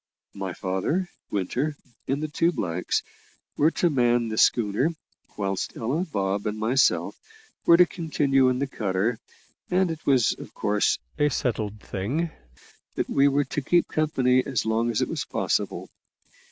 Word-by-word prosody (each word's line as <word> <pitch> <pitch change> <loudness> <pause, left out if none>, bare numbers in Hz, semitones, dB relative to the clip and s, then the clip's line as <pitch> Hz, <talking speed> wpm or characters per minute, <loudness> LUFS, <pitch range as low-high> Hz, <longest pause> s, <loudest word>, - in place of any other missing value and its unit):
My 95 -2 -4
father, 95 - -1 0.2
Winter, 125 +10 -1 0.3
and 140 +3 -1
the - - -1
two 165 +3 +1
blacks, 90 - -1 0.5
were 150 - +4
to 170 0 +1
man 120 -3 +2
the 110 - -4
schooner, 115 +5 +3 0.5
whilst 95 -2 -2
Ella, 145 +11 -1
Bob, 100 -1 -1
and 105 0 -2
myself, 120 +5 +2 0.5
were 170 - +8
to 180 - +7
continue 140 -6 +1
in 125 - 0
the 140 - 0
cutter, 110 -2 -1 0.5
and 180 -1 +2
it 160 -1 -7
was, 130 -5 +3
of - - -11
course, 105 0 +1 0.2
a 145 0 +4
settled 110 -5 -2
thing 135 - -2 0.6
that - - -2
we 140 +1 +4
were 140 0 +2
to 145 +2 -3
keep 175 +5 +2
company 130 -5 +2
as 130 -6 -2
long 110 +1 +1
as 115 - +1
it - - -2
was - - -3
possible. - - -1
125 Hz, 155 wpm, -25 LUFS, 105-150 Hz, 0.6 s, were